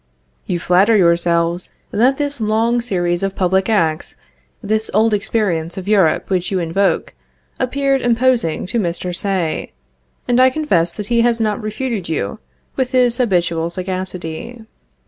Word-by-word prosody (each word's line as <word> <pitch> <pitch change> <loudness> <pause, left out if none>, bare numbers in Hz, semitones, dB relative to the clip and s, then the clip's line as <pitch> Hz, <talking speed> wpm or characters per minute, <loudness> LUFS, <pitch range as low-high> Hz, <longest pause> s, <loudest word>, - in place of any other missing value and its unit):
You 180 - -1
even 170 - -5
flatter 195 +5 +4
yourselves 170 -1 +1 0.2
that 255 +5 +2
this 285 -4 -2
long 225 +3 +1
series 175 -6 -1
of 195 0 -2
public 190 +2 +1
acts, 165 -7 0 0.5
this 215 +1 -1
old 220 +1 +3
experience 195 -6 -1
of 190 0 -6
Europe 195 -7 +3
which 185 -2 -1
you 195 - -1
invoke, 180 +3 0 0.5
appeared 275 +1 +1
imposing 240 -7 +1
to 230 +6 -2
Mr. 180 -1 -3
Say; 180 - -2 0.5
and 245 0 +2
I 260 0 +7
confess 255 - +1
that 210 -1 -7
he 235 - +4
has 235 0 +2
not 215 0 0
refuted 215 -3 -3
you, 100 -11 -3 0.4
with 260 -1 -2
his 245 -1 +3
habitual 170 -7 +1
sagacity. 185 +4 -5
200 Hz, 145 wpm, -18 LUFS, 175-235 Hz, 0.5 s, I